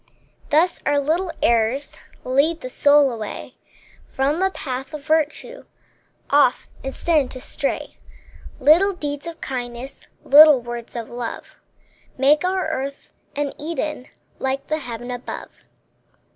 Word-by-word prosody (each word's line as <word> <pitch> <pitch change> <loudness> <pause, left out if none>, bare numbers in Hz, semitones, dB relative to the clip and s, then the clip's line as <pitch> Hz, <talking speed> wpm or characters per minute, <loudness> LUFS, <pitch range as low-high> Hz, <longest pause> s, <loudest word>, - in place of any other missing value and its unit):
Thus 325 +4 +2
our 290 - +2
little 330 +5 0
errors 235 +5 +1 0.2
Lead 285 +6 +1
the 255 - -7
soul 285 -1 +5
away 220 -3 -6 0.5
From 280 +5 0
the 380 +1 +2
path 270 -4 -5
of 295 - -8
virtue, 315 +10 -1 0.7
Off 280 -3 +4 0.2
in 270 - -4
sin 305 -3 +1
to 255 - -6
stray. 275 +2 -4 0.6
Little 330 +9 +5
deeds 290 -3 -5
of 335 -1 -7
kindness, 245 0 -6 0.2
Little 300 -1 +8
words 240 0 -7
of 235 -1 -6
love, 240 -1 -6 0.6
Make 285 +5 +4
our 370 0 0
earth 280 -3 -5 0.2
an 285 -1 -2
Eden, 305 -3 -4 0.3
Like 265 +1 -2
the 310 0 -1
heaven 245 -2 -6
above. 245 0 -6
280 Hz, 130 wpm, -22 LUFS, 255-310 Hz, 0.7 s, Little